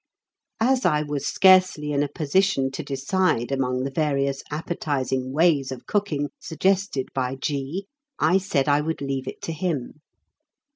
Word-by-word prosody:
As 255 +3 +2
I 150 -3 +2
was 145 -2 -3
scarcely 185 -6 +4
in 140 -1 +1
a 145 - +1
position 150 -2 +1
to 135 - -4
decide 140 -1 0
among 130 -1 0
the 135 - -3
various 140 -2 0
appetising 140 -5 -2
ways 145 -3 +2
of 130 - -7
cooking 155 -9 -1
suggested 180 -3 0
by 130 -1 -1
G., 145 +7 -3 0.3
I 180 +5 +3
said 145 -7 0
I 145 0 +4
would 160 -1 -3
leave 135 -1 -3
it - - -7
to - - -3
him. 155 -5 -3
145 Hz, 150 wpm, -24 LUFS, 135-175 Hz, 0.3 s, scarcely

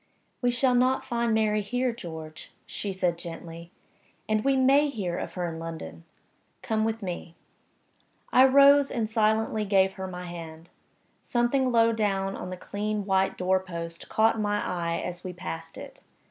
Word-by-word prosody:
"We 245 - +2
shall 250 +1 +2
not 255 +2 +2
find 235 -1 0
Mary 215 -1 +2
here, 245 +5 -1
George," 160 -7 -9
she 200 - -5
said, 180 -3 -1
gently. 170 0 -8 0.6
"And 215 0 +1
we 275 -1 +3
may 275 +3 +4
hear 190 -9 -3
of - - -5
her 180 -1 -2
in 165 -1 -6
London. 165 0 -7 0.6
Come 220 -2 0
with 225 -1 -2
me." 175 -2 -6 1.0
I 255 - +8
rose 280 +1 +6
and 225 -3 -1
silently 220 0 +1
gave 195 -1 +3
her 190 0 -6
my 180 -1 -7
hand. 165 -1 -9 0.5
Something 250 +2 +1
low 230 -1 +4
down 195 -3 -1
on - - -6
the 185 - -6
clean 210 +2 -3
white 190 -1 +1
door 185 +1 +2
post 170 -2 -7
caught 220 +1 +3
my 205 -1 0
eye 170 -2 -2
as 180 0 -6
we 185 - -5
passed 165 -2 -7
it. - - -10
205 Hz, 165 wpm, -27 LUFS, 175-230 Hz, 1.0 s, I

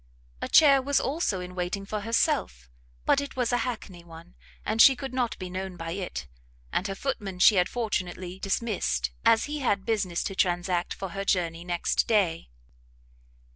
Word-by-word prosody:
A - - -2
chair 280 -4 +6
was 280 +1 +1
also 270 - -1
in 180 0 -8
waiting 180 +2 -3
for 210 +1 -4
herself, 65 - 0 0.3
but 280 - +3
it 280 - -7
was 250 -2 0
a 245 - +2
hackney 215 -8 -5
one, 170 +1 -13 0.3
and 220 +1 +2
she 270 - +8
could 270 -1 -7
not 245 -3 -1
be 185 - -6
known 185 0 -5
by 165 -1 -5
it; 175 - -5 0.5
and 190 - 0
her 195 - -4
footman 205 -6 -4
she 195 +3 +6
had 180 - +3
fortunately 185 -5 -3
dismissed, 180 - -1
as 225 - +5
he 300 +1 -4
had 205 -8 0
business 200 -6 -1
to 195 - -3
transact 175 -1 0
for 195 - -5
her 195 +3 -4
journey 170 -3 0
next 175 -1 0
day. 185 - +1
195 Hz, 175 wpm, -27 LUFS, 175-230 Hz, 0.5 s, she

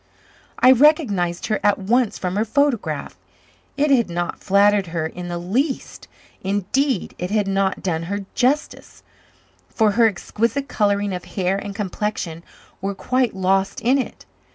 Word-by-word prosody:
I 255 - +6
recognized 235 - +3
her 215 - 0
at 205 -1 +3
once 225 +4 +1
from 180 0 -3
her 210 - +2
photograph. 225 - 0 0.6
It 290 0 +2
had 235 -7 +3
not 175 0 -3
flattered 200 0 +3
her 165 -1 -2
in 175 +2 -6
the 175 0 -3
least; 245 - -2 0.4
indeed, 205 +5 0
it 180 - -3
had 210 -1 +1
not 195 0 0
done 165 -4 -1
her 200 0 -3
justice, 275 +5 -1 0.7
for 220 -2 +2
her 230 +2 +4
exquisite 230 +7 -2
colouring 205 -3 0
of 180 -1 -5
hair 180 +1 -1
and 200 0 -5
complexion 195 -4 -3 0.4
were 195 +1 -2
quite 250 +1 0
lost 190 +1 +1
in 260 +4 +3
it. 260 - -5
205 Hz, 150 wpm, -21 LUFS, 185-240 Hz, 0.7 s, I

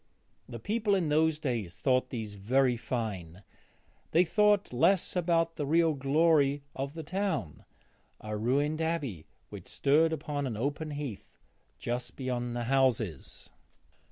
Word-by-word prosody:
The 120 - -6
people 210 - +1
in 175 -5 0
those 155 +1 +3
days 115 - -3
thought 130 -1 +1
these 110 -4 -5
very 125 +6 +2
fine; 100 -7 -4 0.7
they 170 - +4
thought 210 -2 +2
less 180 +11 +2
about 165 -1 +1
the 145 - -1
real 165 +1 +3
glory 145 0 +2
of 140 +3 -4
the 160 - -5
town 165 - -3 0.5
a 105 0 -5
ruined 140 +8 0
abbey 145 - -2 0.2
which - - -10
stood 155 +4 +3
upon 145 -3 -3
an 115 -4 -4
open 145 +6 -2
heath 145 -8 -7 0.4
just 120 +1 -4
beyond 125 -2 -3
the 120 - -2
houses. 120 - 0
140 Hz, 135 wpm, -30 LUFS, 120-160 Hz, 0.7 s, they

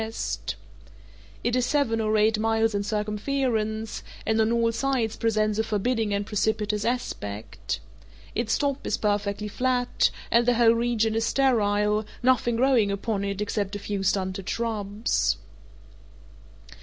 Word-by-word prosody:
It 240 +1 +1
is 255 - +2
seven 245 -4 +1
or 215 0 +1
eight 215 +1 +3
miles 225 0 +2
in 200 - 0
circumference, 215 +1 -1 0.2
and 220 0 +2
on 220 +1 +2
all 230 -1 +2
sides 235 -2 0
presents 215 -1 +1
a - - +3
forbidding 220 +1 0
and 200 0 0
precipitous 210 0 0
aspect. 110 - -3 0.5
Its 225 -1 0
top 280 -1 -1
is - - 0
perfectly 205 0 -1
flat, 250 +3 +1 0.2
and 235 +1 +4
the 245 - +4
whole 230 -1 +5
region 230 -2 +1
is 225 0 +1
sterile, 210 -5 +2 0.2
nothing 245 -2 +3
growing 240 -4 +3
upon 200 0 -2
it 200 0 -3
except 205 -1 -2
a - - -1
few 205 -1 -3
stunted 190 0 -1
shrubs. 215 -2 0
220 Hz, 135 wpm, -26 LUFS, 210-235 Hz, 0.5 s, whole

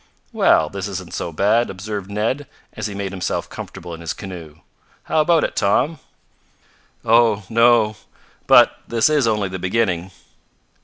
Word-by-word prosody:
"Well, - - +4
this - - -5
isn't - - -7
so 85 - -4
bad," 105 +8 +2
observed 100 +1 -6
Ned, 115 +8 -2 0.3
as 105 -1 -4
he 100 - -7
made 100 -1 -4
himself 95 -2 -3
comfortable 85 0 -8
in 80 - -9
his 85 - -3
canoe. 85 -6 -9 0.5
"How 155 - +1
about 165 0 +3
it, - - -2
Tom?" 125 +10 +1 1.1
"Oh, 115 -2 +4
no. 115 -2 +4 0.5
But - - +6
this 115 +5 +2
is 145 -5 +2
only 105 -3 0
the 95 0 -6
beginning." 95 -2 -1
105 Hz, 150 wpm, -20 LUFS, 95-115 Hz, 1.1 s, But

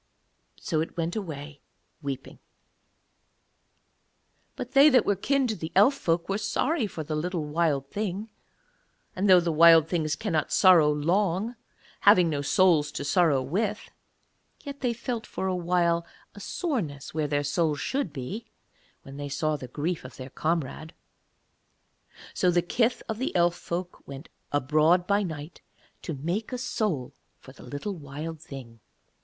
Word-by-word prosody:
So 160 -3 -1
it 165 - -5
went 165 0 -2
weeping 150 -7 -6 0.4
away. 135 -2 -6 2.2
But 250 0 -6
they 275 +3 +7
that 255 -5 +4
were 205 - +2
kin 270 +8 +1
to 220 -3 -1
the 160 -3 -6
Elf 210 +9 +6
folk 170 -9 -1
were 195 +1 -1
sorry 280 +2 0
for 165 -4 -6
the 155 +1 -3
little 165 0 -2
Wild 150 -3 0
Thing; 210 +1 -3 0.8
and 195 +2 0
though 185 -1 +8
the 170 -1 -1
Wild 165 0 +7
Things 155 -3 -1
cannot 175 -7 -1
sorrow 175 -6 +6
long, 185 +8 0 0.4
having 180 -5 +5
no 145 -2 -1
souls 155 0 +3
to - - -4
sorrow 145 -3 +3
with, 210 +9 -2 0.7
yet 280 -1 -8
they 250 -3 0
felt 235 -1 -4
for - - -4
awhile 175 -2 +1 0.3
a 205 - -11
soreness 200 - -3
where 155 -1 -1
their 145 0 0
souls 150 +1 0
should 265 - -2
be, 155 - -6 0.6
when 135 +1 -10
they 145 0 -5
saw 155 +2 0
the 130 -3 -7
grief 155 +7 -3
of 130 - -11
their 130 0 -8
comrade. 160 0 -2 1.4
So 180 - +2
the 175 0 +2
kith 230 +7 0
of 220 0 -4
the 260 - -2
Elf 175 -1 +4
folk 175 +1 -5
went 140 +3 -9 0.2
abroad 155 +5 +3
by 200 +1 +2
night 160 -4 -6 0.4
to 160 - -5
make 175 - -3
a 250 - -2
soul 205 - -2 0.2
for 130 - -14
the 130 - -16
little 145 +11 -5
Wild 155 0 -7
Thing. 130 -7 -10
170 Hz, 155 wpm, -27 LUFS, 150-205 Hz, 2.2 s, though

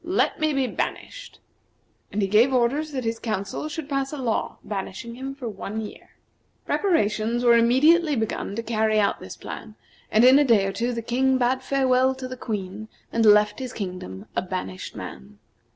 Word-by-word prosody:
Let 360 +4 +1
me 310 0 +2
be 275 -2 +1
banished." - - -5 0.7
And 205 0 -1
he - - +2
gave 220 +7 +4
orders 265 +5 +1
that 260 -3 -3
his 225 0 -2
council 215 +6 -3
should 305 -1 -5
pass 275 -2 -1
a 300 - -5
law 240 -5 -2
banishing 200 +3 -5
him 265 +3 -6
for 265 -4 -6
one 210 0 -5
year. 215 -1 -8 0.6
Preparations 230 - +1
were 240 -1 +6
immediately 290 +7 +4
begun 220 -3 -2
to 230 - -3
carry 220 -1 +1
out 200 -1 +1
this - - -9
plan, 215 -1 -8 0.4
and 220 +3 +5
in 270 +3 +7
day 215 -5 +4
or 195 - -1
two 240 +4 -1
the 230 -1 -4
King 260 +3 +2
bade 255 +1 +1
farewell 260 -1 +2
to 260 -1 -6
the 255 - -6
Queen, 210 -3 -5 0.3
and 230 -1 +3
left 210 0 +5
his 255 -2 -5
kingdom, 180 - -6
a - - +1
banished 180 - -5
man. 65 +10 -9
235 Hz, 185 wpm, -24 LUFS, 210-265 Hz, 0.7 s, in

